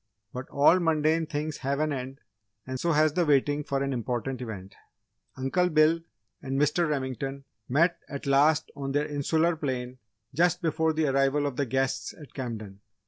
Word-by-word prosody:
But 130 +1 -6
all 145 +6 +5
mundane 160 -1 +2
things 150 0 -3
have 140 +1 -2
an 155 -1 +1
end 135 +1 -6 0.4
and 130 0 -5
so 170 +3 +1
has 155 0 +3
the 180 - +2
waiting 145 -1 +2
for 140 -1 -1
an 140 0 -1
important 125 +2 -3
event. 100 -5 -7 0.6
Uncle 155 +8 +1
Bill 155 +1 +4 0.4
and 135 0 -2
Mr. 150 +3 +2
Remington 135 -1 -3 0.3
met 165 +7 +3
at 140 0 -6
last 145 +3 +3
on 135 -1 -4
their 145 +1 +1
'insular 160 +3 +1
plane' 130 -4 -4 0.3
just 175 +4 +2
before 160 0 +1
the 160 0 0
arrival 135 +1 +2
of 140 -3 -2
the 140 +1 -1
guests 135 +1 -1
at 150 - -13
Camden. 110 -7 -6
140 Hz, 170 wpm, -27 LUFS, 130-155 Hz, 0.6 s, all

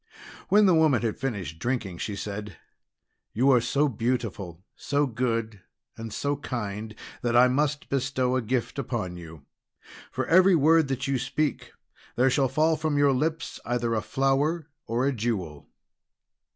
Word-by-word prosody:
When 205 +2 +6
the 185 - +5
woman 155 -8 +3
had 110 -2 -2
finished 95 - -4
drinking, 110 -6 -3
she 105 - -3
said: 105 -1 -6 0.8
"You 130 +5 +3
are 125 -2 +5
so 140 +5 +1
beautiful, 110 - -3
so 145 +1 0
good, 115 -4 -2 0.3
and 115 -1 -7
so 145 +6 -2
kind, 110 -5 -5 0.3
that 120 0 0
I 125 +1 +7
must 145 +3 0
bestow 130 -1 0
a 130 - +1
gift 125 +3 -2
upon 110 -9 -3
you. 80 -4 -11 0.7
For - - -2
every 185 +2 +5
word 160 0 +4
that 135 0 -2
you 135 -2 0
speak, 140 +4 -2 0.4
there 130 +2 +3
shall 135 -1 +2
fall 160 +3 +2
from 155 -1 -1
your 145 -1 +4
lips 155 +5 -2
either 120 -1 -1
a 110 - 0
flower 140 +7 0 0.2
or 120 +3 0
a 140 - +1
jewel." 100 - -3
125 Hz, 155 wpm, -26 LUFS, 110-145 Hz, 0.8 s, I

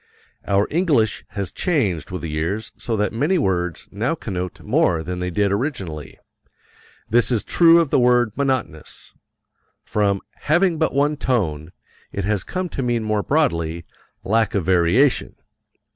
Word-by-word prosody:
Our 100 +1 +2
English 145 - +1
has 100 -3 -2
changed 115 - -1
with 90 -2 -6
the - - -2
years 80 +8 -3
so 115 -2 -3
that 105 0 0
many 150 +11 +1
words 90 - -1
now 115 +10 -1
connote 90 - -5
more 85 -2 +1
than 90 +2 -5
they 90 0 -2
did 100 +2 +1
originally. 100 - -3 0.9
This 120 +2 +3
is 115 -4 +1
true 170 -1 +5
of 165 -5 0
the - - +4
word 120 -2 +3
monotonous. 130 - -3 0.7
From 100 -2 0 0.2
"having 170 +1 +1
but 160 -4 0
one 145 +2 +2
tone," 85 - -1 0.4
it 100 - -3
has 100 -1 0
come 185 0 -3
to 140 - -4
mean 120 -2 0
more 110 -1 0
broadly, 85 - 0 0.4
"lack 110 +2 +1
of 95 -5 0
variation." 95 +10 +2
105 Hz, 150 wpm, -21 LUFS, 90-135 Hz, 0.9 s, true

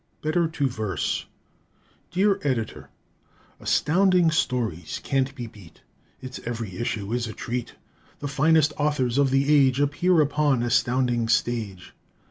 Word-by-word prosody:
Better 160 +2 +1
to 145 -3 -1
Verse 110 - -2 0.8
Dear 195 +2 +2
Editor: 125 -6 -3 0.7
Astounding 180 +1 +3
Stories 115 - -1
can't 135 0 0
be 125 -3 -5
beat; 100 -7 -15 0.4
Its 130 0 -7
every 115 -6 -5
issue 110 -2 -3
is 120 -1 -1
a 110 - -6
treat. 120 0 -5 0.4
The 145 - -5
finest 150 +2 +3
authors 140 -4 +1
of 140 -1 +3
the 135 +3 +2
age 135 -2 +4
Appear 160 +5 +2
upon 145 -4 +2
Astounding's 120 -1 +1
stage. 110 -7 -2
130 Hz, 125 wpm, -25 LUFS, 115-150 Hz, 0.8 s, age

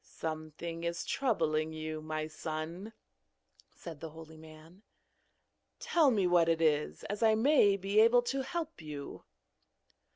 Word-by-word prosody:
'Something 160 +1 -6
is 170 0 -3
troubling 160 - 0
you, 155 0 -5
my 155 0 -3
son,' 160 +6 -6 0.8
said 165 -4 -10
the 165 - -7
holy 160 0 -12
man; 160 +3 -15 1.0
'tell 320 -5 +3
me 205 -7 +2
what 175 -2 +4
it 165 -1 +2
is, 150 -2 +1
as 205 +2 -5
I 220 -1 +5
may 220 -4 +4
be 200 +2 +1
able 235 +2 +6
to 270 +3 -2
help 325 - -5
you.' 150 -2 -8
165 Hz, 135 wpm, -32 LUFS, 155-215 Hz, 1.0 s, able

